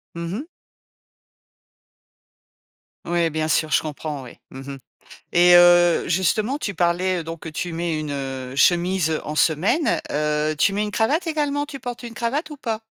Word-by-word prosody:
Mmh 170 +1 -5
mh. 260 - -4 2.6
Ouais, 170 -1 0
bien 155 0 -1
sûr, 155 -1 +1
je - - +3
comprends, 150 -1 -5
ouais. 125 - -13
Mmh 130 - -9
mh. - - -8 0.5
Et 175 0 +6
heu, 175 -1 +6
justement, 210 - +1
tu 205 -9 -4
parlais, 175 +1 0
donc, 165 0 -7
que 165 - -6
tu 170 +3 -4
mets 165 -1 -2
une, 150 -1 -4
heu, 135 -2 -5
chemise 175 0 +2
en 150 - -5
semaine. 195 - +2
Heu, 150 +1 0
tu 195 - +3
mets 205 +1 0
une 210 - -4
cravate 275 - +1
également, 290 -2 -1
tu 290 -2 -9
portes 245 -1 -7
une 235 -1 -7
cravate 275 +8 -2
ou 300 - -9
pas? 225 -4 -4
175 Hz, 165 wpm, -22 LUFS, 155-225 Hz, 2.6 s, Et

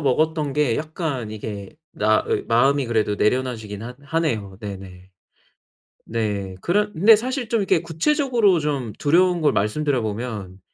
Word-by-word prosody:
먹었던 150 +1 +1
게 145 -5 +1
약간 150 -7 -3
이게 105 -2 -6 0.2
나의 110 +1 +1
마음이 135 +3 +3
그래도 110 -3 0
내려놔 125 +3 +1
지긴 105 -1 -8
하 120 +2 -7
하네요. 140 - -2
네네. 95 -3 -9 1.0
네, 105 -4 -2
그런 205 +4 +1
근데 210 +7 +7
사실 245 +1 -3
좀 230 -3 +1
이렇게 175 -4 +2
구체적으로 230 - +2
좀 140 -7 -2
두려운 175 +3 +3
걸 150 - +4
말씀드려 125 +6 0
보면 105 -4 -5
130 Hz, 300 characters per minute, -22 LUFS, 105-165 Hz, 1.0 s, 근데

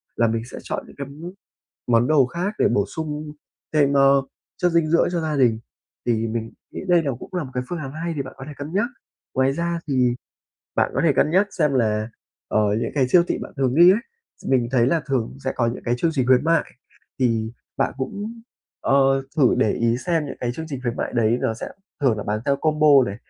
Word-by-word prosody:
là 115 - +3
mình 115 0 -1
sẽ - - -7
chọn - - -4
những - - -15
cái 140 -1 -5 0.8
món 120 0 +3
đồ 145 -3 +4
khác 175 - -3
để - - +4
bổ 100 -4 +1
sung 150 +5 -5 0.4
thêm, 145 -2 +4
ơ, 135 0 +5 0.4
chất 180 -1 +2
dinh 165 -1 +3
dưỡng 170 +2 +3
cho 175 - 0
gia 155 -2 -2
đình 120 -5 +3 0.5
thì 115 -1 +1
mình 115 0 -4 0.2
nghĩ - - -5
đây 175 -2 +5
là 140 -3 -1
cũng - - -10
là 180 -3 -1
một 130 - -9
cái 125 - -1
phương 175 - -3
án 135 -4 -6
hay 165 +3 -3
thì 140 - -1
bạn 130 - -10
có 135 - -9
thể - - -7
cân 145 +3 -7
nhắc. 205 +5 +2 0.5
Ngoài 130 +1 +2
ra 170 +3 -2
thì 125 -3 +2 0.6
bạn - - +2
có - - +1
thể 160 - +5
cân 145 +3 +2
nhắc 190 +5 +4
xem 150 -4 +2
là, 110 -3 +1 0.4
ờ, 110 - +2 0.2
những 115 - -2
cái 135 -4 +2
siêu 175 +6 +6
thị - - 0
bạn - - -8
thường 130 -2 +1
đi 175 +4 +8
ấy, 210 - +1 0.4
s - - -10
mình 125 -3 +2
thấy 120 -3 +4
là 165 +5 +2
thường 130 -3 -1
sẽ 130 - 0
có 120 - +2
những 115 +2 -4
cái 120 - +1
chương 165 - +1
trình 130 -4 +1
khuyến 130 +1 +4
mại 165 -1 +3 0.6
thì 115 -3 +1 0.2
bạn - - 0
cũng, 205 - -5 0.4
ờ, 135 0 +3
thử 135 -6 +4
để 110 - +3
ý 115 -1 +1
xem 165 -4 +1
những 135 - -7
cái 120 - -1
chương 160 +4 -6
trình 135 -4 -5
khuyến 120 -1 -2
mại - - -3
đấy 115 0 +2
nó 110 - 0
sẽ 115 - -6 0.3
thường 125 -6 +2
là 105 - -4
bán 105 +1 -1
theo 140 - +3
combo 155 0 +2 0.2
này 100 - -4
135 Hz, 240 wpm, -22 LUFS, 120-160 Hz, 0.8 s, đi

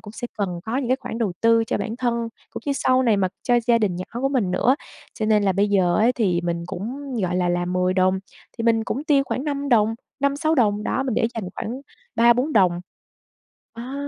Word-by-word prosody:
cũng 210 - -11
sẽ 240 - -5
cần 180 -4 -2
có 225 +3 -2
những 270 -3 -1
cái 255 - +3
khoản 230 - -6
đầu 215 -6 0
tư 230 0 +4
cho - - -1
bản 225 0 -4
thân, 245 -2 0 0.4
cũng - - -8
như 285 - +1
sau 260 -1 +2
này 230 -4 +3
mà 190 -2 +1
cho 245 -1 +3
gia 235 -1 +4
đình 195 -5 0
nhỏ 185 - -4 0.2
của 270 - +1
mình 245 -9 0
nữa. 255 +9 +2 0.4
Cho 215 - -2
nên 210 -1 +3
là 195 - +2
bây 200 +2 +1
giờ 185 -3 +2
ấy 230 +4 +4
thì 190 -8 +1
mình 170 -1 -2
cũng, 250 +9 -6
gọi 180 -1 0
là, 180 -1 +1
làm 175 0 -1
10 180 0 +1
đồng 185 0 +2 0.4
thì 230 - -2
mình 225 -1 +2
cũng 275 +5 -3
tiêu 285 -3 +3
khoảng 265 - -3
5 285 -1 -2
đồng, 225 -3 +3 0.3
5-6 285 +3 +1
đồng, 210 -6 +2
đó 265 - 0
mình 260 -4 -2
để 235 0 +2
dành 225 - -4
khoảng 245 +5 -5 0.3
3-4 240 +6 +3
đồng. 180 -4 +3 0.9
À, 245 +4 -7
225 Hz, 235 wpm, -23 LUFS, 190-255 Hz, 0.9 s, tư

